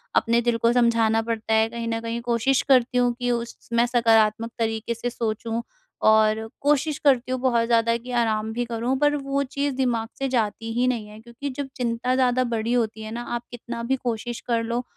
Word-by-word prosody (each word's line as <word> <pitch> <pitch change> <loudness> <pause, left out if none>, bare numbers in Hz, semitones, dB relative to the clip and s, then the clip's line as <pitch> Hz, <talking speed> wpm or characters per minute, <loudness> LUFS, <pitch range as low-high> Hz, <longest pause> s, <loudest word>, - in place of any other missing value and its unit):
अपने 235 +1 +3
दिल 240 -1 +1
को 230 +1 +3
समझाना 230 -2 +3
पड़ता 225 -1 -2
है, 220 0 +4
कहीं 235 0 -5
न 225 0 -1
कहीं 230 +1 -4
कोशिश 240 +3 +1
करती 255 -2 +3
हूँ 245 -1 +3
कि 245 0 0
उस 235 -1 -3
स - - -24
मैं 235 +1 +4
सकारात्मक 230 -2 +3
तरीके 225 0 -1
से 235 +1 -3
सोचूँ 225 0 -3 0.4
और 220 0 +4
कोशिश 295 +1 +1
करती 255 -3 +3
हूँ 255 - -1
बहुत 235 -3 +2
ज़्यादा, 230 0 +3
कि 245 +2 -10
आराम 220 -2 0
भी 240 +1 -1
करूँ, 235 +3 -1
पर 295 0 +3
वो 275 0 -1
चीज़ 280 0 -2
दिमाग 240 -4 0
से 270 - 0
जाती 225 -2 -1
ही 245 +2 +1
नहीं 235 -4 -1
है। 210 +1 -12
क्योंकि 235 +5 -7
जब 285 -1 -3
चिंता 245 0 -1
ज़्यादा 255 -1 +2
बड़ी 230 -1 -1
होती 225 -2 0
है 215 - -7
ना, 235 +2 -4
आप 240 0 -3
कितना 235 -1 -6
भी 260 +3 +1
कोशिश 240 0 -3
कर 230 -2 +1
लो। 235 +2 -2
235 Hz, 210 wpm, -24 LUFS, 225-250 Hz, 0.4 s, है